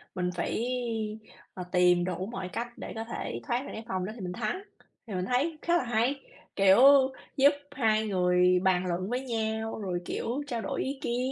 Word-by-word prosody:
mình 180 -1 0
phải, 215 +6 -1 0.9
ờ, 180 - -6
tìm 180 -1 +4
đủ 185 0 -3
mọi 185 -6 -5
cách 235 +1 -2
để - - -7
có 225 - -3
thể 175 - -5
thoát 245 - +1
được - - -7
cái 220 - -6
phòng 185 -4 -2
đó 205 - -4
thì 230 - -9
mình 180 -1 -4
thắng. 220 - -2 0.5
Thì 210 - -6
mình 180 0 -1
thấy 280 - 0
khá 345 0 +3
là - - 0
hay, 245 +4 0 0.3
kiểu 195 +2 +6 0.6
giúp 280 +2 +7 0.2
hai 220 -4 +1
người 180 -1 +3
bàn 185 -1 +2
luận 180 +3 -2
với 250 +1 -1
nhau, 220 -3 -2
rồi 180 -3 -2
kiểu 245 +10 -2
trao 240 -4 -2
đổi 275 +1 -2
ý 270 +1 -4
kiến, 250 +2 -1
220 Hz, 200 wpm, -29 LUFS, 180-245 Hz, 0.9 s, giúp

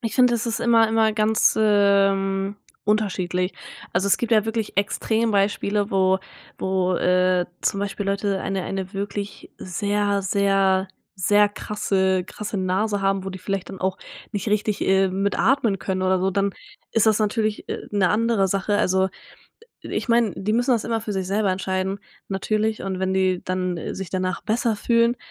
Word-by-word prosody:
ich 230 - -3
finde, 250 -2 +5
das 235 0 -1
ist 230 - -2
immer 230 -1 +4
immer 220 -1 +2
ganz, 215 0 +3
ähm, 195 -1 +2 0.3
unterschiedlich. 185 -3 0 0.4
Also, 185 +2 +1
es 200 - +4
gibt 235 0 -2
ja 215 -2 +4
wirklich 225 -3 -3
Extrembeispiele, 205 0 0
wo 190 -1 +3 0.4
wo, 185 -1 0
äh, 180 0 +2 0.2
zum 200 - 0
Beispiel 200 0 -3
Leute 195 0 -1
eine 195 -1 -2
eine 190 +1 -5
wirklich 200 +1 -5
sehr, 205 +1 -1
sehr, 195 -1 +2 0.3
sehr 205 +2 +3
krasse 190 -3 0
krasse 210 0 -6
Nase 195 +2 0
haben, 195 -1 +1
wo 195 - -4
die 190 - -7
vielleicht 195 0 -3
dann 195 -1 -9
auch 190 0 -1 0.3
nicht 205 0 -3
richtig, 210 0 0
ähm, 190 0 +2
mit 200 -1 0
atmen 230 -8 +2
können 185 +1 -2
oder 185 0 +2
so, 190 +1 +1
dann 200 0 0 0.4
ist 225 -1 +3
das 215 -1 +4
natürlich, 215 0 -1
äh, - - -3
'ne 200 -3 +2
andere 215 -2 +2
Sache. 200 +2 0
Also, 190 +1 +2 0.7
ich - - -4
meine, 230 -3 +3
die 210 +2 -1
müssen 245 +3 +2
das 230 -3 +2
immer 225 -1 -1
für 215 -1 -5
sich 190 -1 -2
selber 200 0 +1
entscheiden 190 +1 -2 0.3
natürlich, 215 +3 -1
und 190 -1 -3
wenn 190 0 0
die 185 -1 +1
dann 185 -2 -3
sich 190 -3 -6
danach 185 -1 -2
besser 225 0 0
fühlen 235 +2 +2
200 Hz, 170 wpm, -23 LUFS, 190-215 Hz, 0.7 s, finde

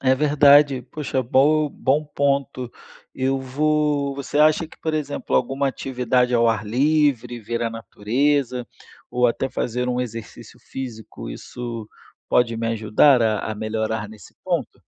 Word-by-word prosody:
É 130 0 +3
verdade, 145 -1 +5
poxa, 130 0 -3
bom 150 +5 +3
bom 145 +2 0
ponto, 140 -3 -1 0.4
eu 135 +1 0
vou 145 +1 0
você 140 +1 -3
acha 155 +2 +4
que, - - -18
por 160 -1 -2
exemplo, 145 -2 -3
alguma 140 +1 +1
atividade 125 -1 0
ao 115 0 +4
ar 110 -2 0
livre, 125 0 +1
ver 115 +2 -3
a 115 - -1
natureza, 125 +3 -1 0.4
ou 125 0 +2
até 130 +3 -1
fazer 125 -1 -2
um 125 0 0
exercício 115 -3 -8
físico, 120 -5 -8
isso 115 -3 -7 0.4
pode 120 -2 +2
me 115 0 -2
ajudar 115 +4 +4
a 110 -1 0
a - - -3
melhorar 110 0 -3
nesse 105 -3 -14
ponto? - - -2
130 Hz, 145 wpm, -22 LUFS, 115-140 Hz, 0.4 s, verdade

